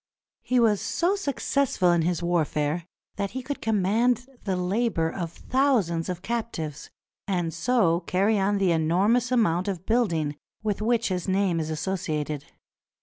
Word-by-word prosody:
He 250 0 +1
was 215 -4 +3
so 350 +4 +1
successful 280 - +1
in 170 -1 +3
his 175 +1 0
warfare 165 -1 0 0.3
that 200 -1 -1
he 260 - -4
could 285 +2 -5
command 225 +4 +2 0.2
the 190 -2 0
labor 180 -2 0
of 170 -4 -4
thousands 215 -11 +1
of 180 0 -4
captives, 220 -11 -4 0.4
and 175 -4 -1
so 170 -2 +2
carry 195 +4 +1
on 200 +1 +2
the 190 -3 +2
enormous 190 +10 +2
amount 190 -7 +2
of 185 -3 -3
building 165 -11 +1 0.3
with 210 -1 -1
which 230 0 +1
his 180 -1 -2
name 190 -3 +1
is 155 -1 -3
associated. 155 -3 -3
190 Hz, 145 wpm, -26 LUFS, 165-230 Hz, 0.4 s, was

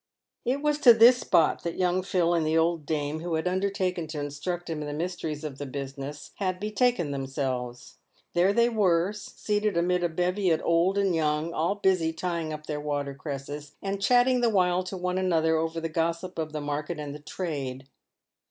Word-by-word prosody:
It 265 +4 0
was 300 0 +1
to 240 -5 +8
this 235 +3 +8
spot 160 - +3
that 170 - -4
young 180 0 +2
Phil, 175 -2 +1
and 165 -2 +2
the 155 +1 +1
old 165 -2 +1
dame 150 0 -1
who 170 0 -2
had 160 +3 -1
undertaken 185 -2 -1
to 155 -1 -5
instruct 145 +5 -4
him 160 -2 -3
in 150 - -4
the 145 - -4
mysteries 160 -2 -4
of 145 -3 -6
the 145 - -4
business, 140 +1 -6
had 185 -2 -1
be 210 +2 -3
taken 215 - +1
themselves. 130 -3 -4 0.4
There 180 +3 +4
they 235 +3 +4
were, 195 -5 +2
seated 210 -1 -2
amid 180 +1 +1
a 175 - +2
bevy 180 +3 0
of 160 - +3
old 170 +4 +2
and 195 -2 +2
young, 155 +1 0
all 170 +5 0
busy 185 -5 +2
tying 170 -1 -3
up 155 0 -6
their 150 -1 -3
water 145 -1 -2
cresses, 145 +1 -7
and 195 0 -3
chatting 245 +3 +4
the 240 - +4
while 180 -3 +2
to 185 +1 -5
one 180 +1 -1
another 160 -3 +2
over 165 +1 -1
the 165 - -2
gossip 165 +2 -2
of 155 -1 -3
the 155 -1 -4
market 145 +3 -3
and 145 -1 -5
the 150 - -8
trade. 140 -5 -5
170 Hz, 200 wpm, -27 LUFS, 150-185 Hz, 0.4 s, to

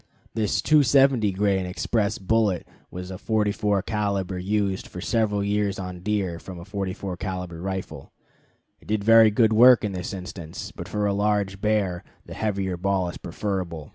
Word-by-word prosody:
This 110 -2 0
270 135 -6 +4
grain 95 -1 +1
express 105 +3 -1
bullet 105 -2 +1 0.2
was 90 +1 -7
a 95 - -7
44 105 -2 0
caliber 100 -3 -2
used 100 0 -1
for 90 - -9
several 105 0 0
years 100 -1 0
on 90 -2 -6
deer 95 -3 -2
from 90 -1 -9
a 85 - -10
44 95 -2 -4
caliber 90 -3 -5
rifle. 95 -7 -5 0.7
It - - -21
did 105 -1 -1
very 115 0 +7
good 110 +1 +3
work 120 +2 +7
in 105 - -1
this 90 -2 -5
instance, 90 -3 -7
but - - -8
for 105 -1 -1
a 100 - +1
large 100 -1 0
bear 100 -5 0 0.2
the - - -9
heavier 95 -4 -2
ball 95 0 0
is - - -8
preferable. 85 -4 -4
100 Hz, 165 wpm, -24 LUFS, 90-105 Hz, 0.7 s, very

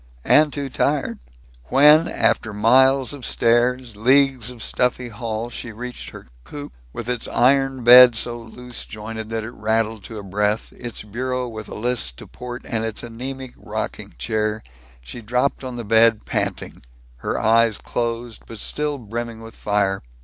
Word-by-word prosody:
And 150 0 +5
too 140 -1 -3
tired. 140 -2 -1 0.5
When, 150 - +6
after 110 - 0
miles 130 +5 +4
of 140 -3 -9
stairs, 120 0 +1
leagues 130 +1 +3
of 125 -2 -8
stuffy 125 0 0
hall, 115 +1 -4
she 115 - -6
reached 125 +3 -7
her - - -12 0.2
coop, 145 - -9 0.2
with 120 - -6
its 125 -2 -2
iron 135 0 +2
bed 125 0 +9
so 120 +1 -3
loose 125 +2 -9
jointed 110 +1 -7
that 115 -1 -3
it 115 - -6
rattled 110 -2 -1
to 110 - -8
a 105 - -7
breath, 105 +3 -1
its 120 -4 -8
bureau 125 +4 -3
with 110 -2 -8
a - - -7
list 115 - -2
to - - -10
port, 125 0 -8
and 110 -2 -2
its 110 -1 -4
anemic 130 +2 -7
rocking - - -6
chair, 105 - -1 0.4
she 65 - -9
dropped 125 +5 0
on 130 -1 -5
the 120 -2 -5
bed, 115 +1 +4
panting, - - -3 0.4
her - - -3
eyes 115 -1 +3
closed 115 -1 -4
but 115 - -9
still 150 +6 -3
brimming 115 -1 -6
with 115 0 -11
fire. 100 -2 0
120 Hz, 165 wpm, -22 LUFS, 110-125 Hz, 0.5 s, bed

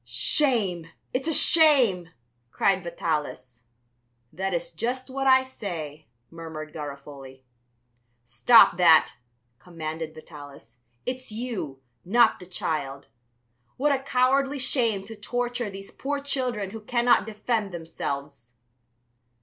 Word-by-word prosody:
"Shame! 180 - +1 0.3
It's 260 +4 -1
a - - +1
shame!" 265 - +5 0.4
cried 190 +7 +1
Vitalis. 150 -8 -4 0.7
"That 190 +4 -3
is 170 -2 -3
just 255 +2 -4
what 270 +1 -2
I 260 0 +6
say," 160 - -7 0.2
murmured 160 -2 -8
Garofoli. 140 -3 -9 0.8
"Stop 145 - +5
that," 165 -3 +5 0.5
commanded 160 -2 -6
Vitalis; 145 -7 -13 0.3
"it's 255 -1 -5
you, 215 - -5 0.2
not 235 +7 +3
the 180 - -12
child! 140 -6 -4 0.7
What 290 +3 +2
a 275 - +1
cowardly 270 +1 +1
shame 235 -6 0
to 225 +2 -9
torture 245 +2 -3
these 195 0 -10
poor 285 +1 -3
children 250 -8 -3
who 220 +1 -8
cannot 240 +1 +2
defend 215 -1 -2
themselves." 140 -6 -6
195 Hz, 110 wpm, -25 LUFS, 155-250 Hz, 0.8 s, I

